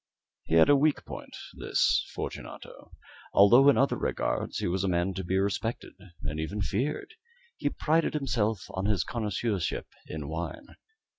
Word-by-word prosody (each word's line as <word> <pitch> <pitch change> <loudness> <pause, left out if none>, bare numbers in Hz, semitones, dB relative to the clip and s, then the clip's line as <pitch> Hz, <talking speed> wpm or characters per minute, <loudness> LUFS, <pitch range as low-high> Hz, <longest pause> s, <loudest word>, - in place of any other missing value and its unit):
He 80 - 0
had 80 - +7
a 145 - +6
weak 150 +2 +2
point - - -8 0.2
this - - +1
Fortunato - - -7 0.4
although 120 +8 +7
in 140 - +4
other 135 - +3
regards - - -2
he - - -2
was 95 +2 0
a - - +1
man 90 +1 +1
to 95 +1 -4
be 95 +2 0
respected 100 +4 -2 0.3
and 75 +1 -3
even 90 +7 -3
feared. 135 - -2 0.4
He 145 - -1
prided 160 +2 +1
himself 110 -8 0
on 95 +1 -3
his 105 -5 +1
connoisseurship 105 -4 -2 0.2
in 75 -2 -5
wine. 85 - -5
100 Hz, 155 wpm, -28 LUFS, 90-135 Hz, 0.4 s, had